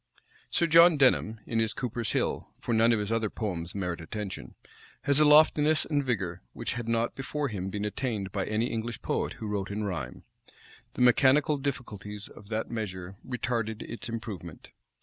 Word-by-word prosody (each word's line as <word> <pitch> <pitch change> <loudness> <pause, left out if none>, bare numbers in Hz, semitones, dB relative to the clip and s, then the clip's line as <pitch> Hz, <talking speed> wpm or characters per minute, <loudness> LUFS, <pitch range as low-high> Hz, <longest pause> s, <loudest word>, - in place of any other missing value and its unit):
Sir 170 - +2
John 165 0 +7
Denham, 115 -5 +3
in 115 - -1
his 110 -1 +1
Cooper's 120 -3 -3
Hill, - - -1
(for 120 - -2
none 115 +1 +5
of 115 - +3
his 105 +1 -3
other 115 -2 +1
poems 90 -6 -4
merit 90 -4 -3
attention,) 100 +3 -6 0.5
has 140 0 +3
a 155 - +6
loftiness 150 +1 +6
and 145 -2 0
vigor 95 -9 -2
which - - -3
had 120 -1 -5
not 115 0 +1
before 140 +1 -3
him 95 -3 -4
been 105 +1 -3
attained 105 -3 -2
by 95 -1 -2
any 110 +2 +1
English 115 -1 -4
poet - - -1
who 110 - -8
wrote 100 -2 -2
in 105 +1 -3
rhyme. 80 -11 -4 0.7
The - - -2
mechanical 135 +4 +5
difficulties 105 -7 -5
of 100 - -14
that 110 0 -2
measure 95 -4 -5
retarded 115 -3 -2
its 115 0 -7
improvement. 100 -8 -7
110 Hz, 175 wpm, -29 LUFS, 100-125 Hz, 0.7 s, John